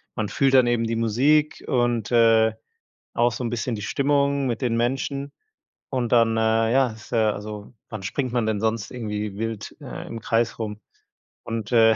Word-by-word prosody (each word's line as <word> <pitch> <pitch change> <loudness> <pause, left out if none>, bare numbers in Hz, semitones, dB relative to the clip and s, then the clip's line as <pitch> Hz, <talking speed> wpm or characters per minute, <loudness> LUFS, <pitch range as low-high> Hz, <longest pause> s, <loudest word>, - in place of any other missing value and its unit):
man 110 -3 -2
fühlt 135 -1 +2
dann 130 -1 +6
eben 120 -1 +1
die 115 - -1
Musik 135 +7 +2
und, 120 -4 0
äh, 115 -2 +4 0.6
auch 120 0 +2
so 125 - -4
'n 120 - -1
bisschen 120 0 -2
die 105 - -6
Stimmung 140 +4 +1
mit 120 0 -2
den 120 -2 0
Menschen 135 +3 -2 0.6
und 125 -3 -1
dann, 115 -1 +4
äh, 110 0 +2
ja, 130 -2 +3
ist 110 +2 -13
ja 110 -3 +2
also, 105 +2 -8 0.2
wann 110 -3 -6
springt 125 +6 -2
man 120 -2 0
denn 110 -2 -1
sonst 110 -1 -1
irgendwie 105 -4 -4
wild, 115 -1 -4
äh, - - -7
im 115 -1 -7
Kreis 115 +1 0
rum 105 -2 -5 0.6
und, 115 0 -4
äh 110 -1 +6
115 Hz, 185 wpm, -24 LUFS, 110-125 Hz, 0.6 s, dann